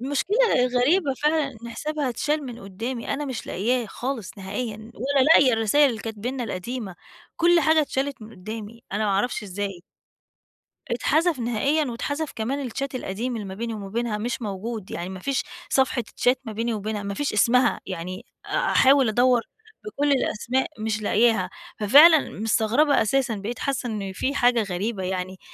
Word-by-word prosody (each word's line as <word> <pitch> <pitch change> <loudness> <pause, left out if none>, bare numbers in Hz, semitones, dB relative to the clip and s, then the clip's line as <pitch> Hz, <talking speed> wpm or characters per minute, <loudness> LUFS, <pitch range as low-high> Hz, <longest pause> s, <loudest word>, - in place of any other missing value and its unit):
المشكلة 290 - +2
غريبة 270 +4 +2
فعلًا 305 -1 +2
إن 235 - -7
حسابها 300 +2 -2
اتشال 295 +5 -1
من 240 -1 -8
قدّامي، 225 +5 -5
أنا 295 - -3
مش 260 -5 -5
لاقياه 240 +5 0
خالص، 235 -2 -5
نهائيًا، 215 +3 -5
ولا 270 +3 +1
لاقية 280 -4 +6
الرسايل 225 +6 +4
اللي 225 -2 -5
كانت 220 -2 -6
بيننا 250 +4 -3
القديمة، 215 -1 -5 0.4
كلّ 345 0 +4
حاجة 315 +1 +4
اتشالت 275 -3 -2
من 215 - -10
قدّامي، 220 +3 -8
أنا 210 +2 0
ما 205 - +1
أعرفش 205 +5 0
إزاي! 195 -2 -5 1.1
اتحذف 310 +6 +1
نهائيًا 245 +6 +1
واتحذف 285 +5 -3
كمان 260 +4 -2
الchat 275 +4 -4
القديم 245 +1 -3
اللي 215 - -5
ما 190 - -6
بيني 230 +2 -4
وما 200 -2 -7
بينها 225 0 -2
مش 240 +3 -3
موجود، 210 0 -5
يعني 175 - -4
ما 190 -1 -7
فيش 265 +3 -1 0.3
صفحة 265 -2 +2 0.2
chat 250 - +5
ما 225 - -6
بيني 230 +2 -1
وبينها، 210 0 -3
ما 200 0 -4
فيش 290 +6 -2
اسمها، 240 +4 +3
يعني 185 0 -6 0.2
أ - - -1
أحاول 270 -2 +5
أدوّر 245 +2 +3 0.4
بكُل 290 -9 0
الأسماء 260 0 0
مش 215 0 -2
لاقياها، 215 -4 +2 0.3
ففعلا 295 +8 +7
مستغربة 225 +7 +3
أساسًا 260 +2 +1
بقيت 210 +5 -5
حاسة 270 -3 -2
إن 200 -3 -4
في 260 +9 -2
حاجة 245 -3 +3
غريبة 195 +1 -3
يعني، 185 0 -3
235 Hz, 165 wpm, -24 LUFS, 210-275 Hz, 1.1 s, ففعلا